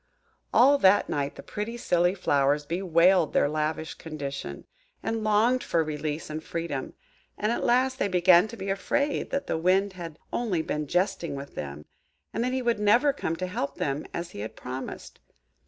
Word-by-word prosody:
All 280 +4 +6
that 195 -1 +5
night 140 -1 -2
the - - -10
pretty 220 +3 -5
silly 175 -4 +2
flowers 145 -4 +2
bewailed 175 0 +3
their - - +3
lavish 155 +1 -2
condition, 145 -4 -6 0.4
and 225 -1 -2
longed 220 +4 +3
for 165 -1 +1
release 155 0 -4
and 155 +1 -5
freedom; 165 -6 -4 0.4
and 210 +2 0
at 235 - -1
last 260 +2 +2
they - - +2
began 180 0 +5
to 230 - -9
be 195 -1 -3
afraid 280 +9 -1
that 275 - -2
the 160 - -1
Wind 190 +3 +2
had 170 -4 -8 0.2
only 195 -9 0
been 150 -1 -3
jesting 180 -2 0
with 140 +1 -8
them, 75 +1 -6 0.5
and 230 - -1
that 250 - 0
he 260 0 -1
would 235 -3 +1
never 235 +8 +4
come 165 - -2
to 185 - -3
help 140 -6 -3
them, 140 +2 -2
as 170 0 -5
he - - -9
had 110 +2 -6
promised. 130 +1 -7
175 Hz, 180 wpm, -27 LUFS, 150-210 Hz, 0.5 s, All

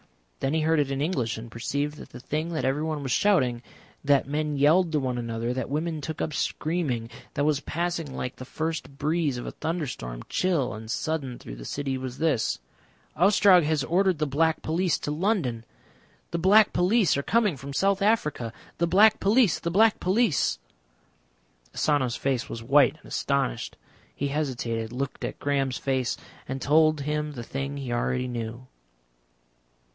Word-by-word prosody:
Then 135 +3 0
he 160 - +2
heard 160 0 +2
it 145 -2 +1
in 135 0 -2
English 130 -9 -1
and 115 +1 -9
perceived 145 +5 -2
that - - -11
the 125 - -10
thing 155 +6 -3
that 155 - -1
everyone 150 +2 -1
was 135 - -3
shouting, 130 -11 +2 0.4
that 140 -2 +3
men 150 0 -1
yelled 160 +5 +4
to 155 - +2
one 130 -2 -2
another, 115 0 -2
that 130 - -3
women 155 +2 -2
took 160 +1 -5
up 155 - -2
screaming, 145 -8 -2 0.2
that 145 - +1
was 150 -1 +2
passing 165 -2 -3
like 125 - -4
the - - -7
first 155 -1 -4
breeze 150 -2 0
of 120 - -5
a - - -4
thunderstorm, 135 - -4
chill 165 -9 0
and 110 0 -8
sudden 135 -2 -2
through - - -9
the - - -9
city, 140 -2 -2
was 130 -1 -6
this: 145 - +1 0.6
"Ostrog 190 +1 +6
has 155 -2 +1
ordered 185 +2 +2
the 155 - 0
Black 160 +3 +1
Police 170 +2 +1
to 145 - -4
London. 150 - 0 0.7
The 170 - -1
Black 205 +4 +5
Police 195 +2 +3
are 140 - 0
coming 210 +1 +2
from 140 +1 -8
South 195 +7 +1
Africa.... 150 - +1 0.3
The 170 - +2
Black 200 +5 +5
Police. 210 -1 +3
The 170 - -2
Black 215 +5 +4
Police." 185 - +2 1.2
Asano's 135 -5 +1
face 135 -2 -1
was 115 - -6
white 135 +1 +4
and - - -22
astonished; - - -1 0.4
he 140 - -2
hesitated, 120 -6 -2
looked 135 +2 -4
at - - -4
Graham's 135 -3 0
face, 130 -3 -1 0.3
and 130 +1 -3
told 155 +2 +3
him 150 +1 -2
the 120 -4 -6
thing 140 +3 -4
he 130 -4 -4
already 125 +1 0
knew. 120 0 -5
145 Hz, 170 wpm, -26 LUFS, 130-165 Hz, 1.2 s, Ostrog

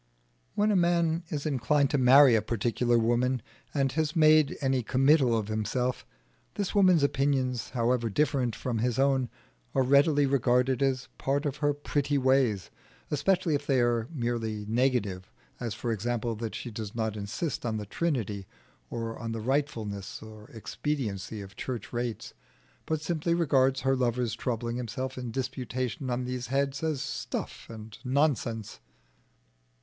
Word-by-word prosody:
When 210 +1 +3
a - - +2
man 170 -2 +2
is 145 -1 -3
inclined 140 0 +2
to 145 - +2
marry 130 +1 +7
a 110 - +4
particular 120 +2 +1
woman, 120 +1 +1 0.3
and 135 -2 +1
has 155 0 -1
made 155 -2 +5
any 135 -3 +1
committal 130 0 +3
of 105 -2 -2
himself, 110 +4 -2 0.5
this 200 -2 -2
woman's 185 -6 +5
opinions, 135 -4 +1
however 120 -1 0
different 125 -1 +1
from 120 -3 -2
his 120 0 0
own, 135 -2 +2 0.5
are 135 - +4
readily 140 +2 +4
regarded 125 -1 +2
as 130 -2 +1
part 140 +2 0
of 145 -1 -2
her 145 -1 +2
pretty 145 0 -1
ways, 130 -7 +2 0.4
especially 180 +3 +1
if 145 0 -2
they 135 -2 +3
are 120 -1 +1
merely 115 -6 -2
negative; 110 -6 0 0.3
as, 115 -4 -3
for 115 +1 -3
example, 115 +2 -1
that 110 0 -5
she 120 - -6
does 105 -1 -6
not 110 -2 -1
insist 105 +9 -3
on 110 -2 -1
the 105 - -4
Trinity 105 - -2 0.4
or 115 -1 -4
on 115 -1 -4
the 115 - -3
rightfulness 115 -7 -2
or 110 -1 -12
expediency 110 -4 -4
of 100 +1 -11
church 120 -2 -5
rates, 120 -1 -3 0.5
but 160 -1 -1
simply 170 +1 0
regards 135 -5 +2
her 135 +1 +2
lover's 120 -2 0
troubling 115 0 -2
himself 130 +2 -4
in 125 -2 -5
disputation 130 0 -3
on 125 0 -1
these 125 -1 -4
heads 140 +1 0
as 155 -3 -1
stuff 145 -2 -5
and 110 -1 -10
nonsense. 130 -5 0
125 Hz, 155 wpm, -28 LUFS, 115-140 Hz, 0.5 s, marry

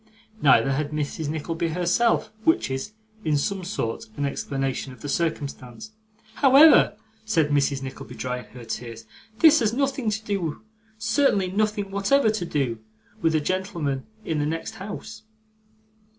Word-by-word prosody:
Neither 135 -1 +5
had 145 +2 -1
Mrs. 150 0 -3
Nickleby 165 +2 -2
herself; 180 +7 +1
which 325 - +2
is, 135 +11 -4 0.3
in 150 -4 +2
some 190 +6 -2
sort, 145 - -3
an 145 - 0
explanation 135 -1 -3
of 120 - -16
the - - -5
circumstance. 140 - -3 0.5
'However,' 275 -4 +7 0.3
said 165 -9 +1
Mrs. 140 -1 +1
Nickleby, 130 0 -8
drying 125 -1 -4
her 125 -2 -10
tears, 115 0 -6 0.3
'this 315 +3 +7
has 220 -1 +1
nothing 270 -3 0
to 215 +1 -3
do 195 -5 -2 0.3
certainly 215 -6 +2
nothing 210 0 0
whatever 215 +5 +3
to 215 -5 -3
do 130 -8 -1 0.4
with 165 -1 +2
the 155 - +3
gentleman 170 -6 -2 0.2
in 155 -2 -1
the 145 - 0
next 165 +1 -4
house. 215 +2 -7
165 Hz, 145 wpm, -25 LUFS, 140-215 Hz, 0.5 s, However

